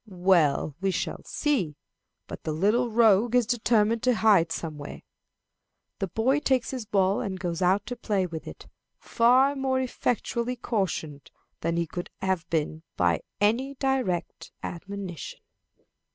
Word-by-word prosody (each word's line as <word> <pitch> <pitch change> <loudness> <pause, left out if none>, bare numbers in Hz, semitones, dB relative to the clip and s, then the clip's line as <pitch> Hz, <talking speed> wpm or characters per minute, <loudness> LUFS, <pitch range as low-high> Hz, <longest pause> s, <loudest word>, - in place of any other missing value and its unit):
"Well, 175 -6 +2
we 195 - +1
shall 185 - -3
see; 220 - -1 0.5
but - - -8
the 155 - -2
little 215 +9 +2
rogue 225 +1 +4
is 245 -2 +4
determined 225 -1 +2
to 250 -1 +2
hide 200 -7 +4
somewhere." 150 -4 -6 1.0
The 195 - -1
boy 240 - +1
takes 260 -4 +1
his 250 -5 -5
ball 195 +3 +2
and 195 -5 -4
goes 175 -1 -3
out 185 +3 +2
to 245 - -5
play 205 -5 0
with 165 -3 -7
it, - - -10 0.3
far 255 +4 +3
more 265 -1 0
effectually 245 -1 -1
cautioned 185 - -3 0.3
than 165 +1 -1
he 170 - +1
could 175 +2 -6
have 185 -3 -1
been 155 -1 -1 0.2
by 85 -2 +2 0.2
any 240 +7 +1
direct 260 -10 -2
admonition. 185 -1 -6
200 Hz, 140 wpm, -27 LUFS, 175-245 Hz, 1.0 s, rogue